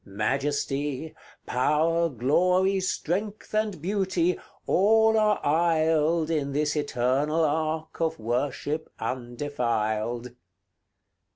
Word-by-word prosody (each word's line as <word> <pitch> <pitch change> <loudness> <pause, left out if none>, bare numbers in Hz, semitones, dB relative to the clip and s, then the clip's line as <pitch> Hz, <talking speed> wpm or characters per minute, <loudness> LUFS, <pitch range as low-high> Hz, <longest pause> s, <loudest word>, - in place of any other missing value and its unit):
Majesty, 140 +7 -2 0.3
Power, 160 +6 +2
Glory, 180 - +2
Strength, 195 +4 -3
and 215 -4 0
Beauty, 185 -1 0 0.3
all 220 +3 +4
are 215 -1 +3
aisled 160 0 +2
In 140 -3 -1
this 150 +1 0
eternal 145 +3 +1
ark 155 +2 -2
of 160 0 0
worship 130 +6 -2
undefiled. 120 -2 -2
155 Hz, 85 wpm, -26 LUFS, 130-175 Hz, 0.3 s, all